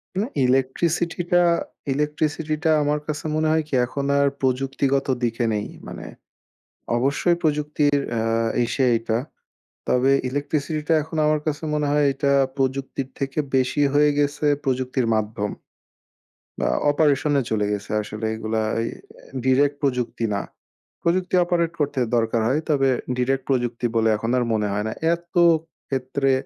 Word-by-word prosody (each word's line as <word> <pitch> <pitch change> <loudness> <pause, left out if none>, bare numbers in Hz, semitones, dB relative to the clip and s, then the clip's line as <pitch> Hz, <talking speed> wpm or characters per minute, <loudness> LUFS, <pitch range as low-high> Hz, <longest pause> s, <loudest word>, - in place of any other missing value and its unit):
মানে 210 +5 0 0.2
ইলেকট্রিসিটিটা 170 +7 +1 0.5
ইলেকট্রিসিটিটা 150 +2 -1
আমার 150 +1 +1
কাছে 155 0 -4
মনে 155 0 +1
হয় 160 0 +3
কি? 155 - -14
এখন 140 +3 -4
আর 140 - +4
প্রযুক্তিগত 135 +1 0 0.2
দিকে 120 0 0
নেই। 105 -1 -1 0.2
মানে, - - -8 0.9
অবশ্যই 145 +7 +2
প্রযুক্তির 150 -1 +1 0.2
আ - - 0 0.4
ইসে 130 +3 0
এইটা। 115 0 0 0.7
তবে 125 +2 +3 0.2
ইলেকট্রিসিটিটা 150 +3 -1
এখন 160 +2 -7
আমার 150 0 +2
কাছে 155 +1 -2
মনে 150 -1 0
হয়, 150 0 +3
এটা 140 +1 0 0.2
প্রযুক্তির 135 0 -2
থেকে 135 +1 -3 0.2
বেশি 130 +3 +1
হয়ে 150 0 +5
গেছে, 145 +1 0 0.2
প্রযুক্তির 130 -2 0
মাধ্যম। 105 -1 -1 1.1
বা - - 0 0.2
অপারেশনে 145 -1 +2
চলে 105 -2 +1
গেছে 105 0 -4
আসলে 105 +1 -6
এগুলা 110 0 -2 0.2
এই 115 - -2 0.6
ডিরেক্ট 140 +2 +3
প্রযুক্তি 125 -4 -1
না। 100 - -1 0.6
প্রযুক্তি 180 +2 +1
অপারেট 170 -1 +1
করতে 145 -2 0 0.2
দরকার 115 0 +1
হয়। 135 +5 +2
তবে 135 -3 +3 0.3
ডিরেক্ট 130 +2 0
প্রযুক্তি 120 -2 0
বলে 115 -1 +3
এখন 115 +2 -3
আর 125 - +2
মনে 105 -1 0
হয় 105 +1 -1
না। - - -2 0.2
এত 170 - -17 0.6
ক্ষেত্রে 135 +1 0
135 Hz, 135 wpm, -23 LUFS, 125-150 Hz, 1.1 s, হয়ে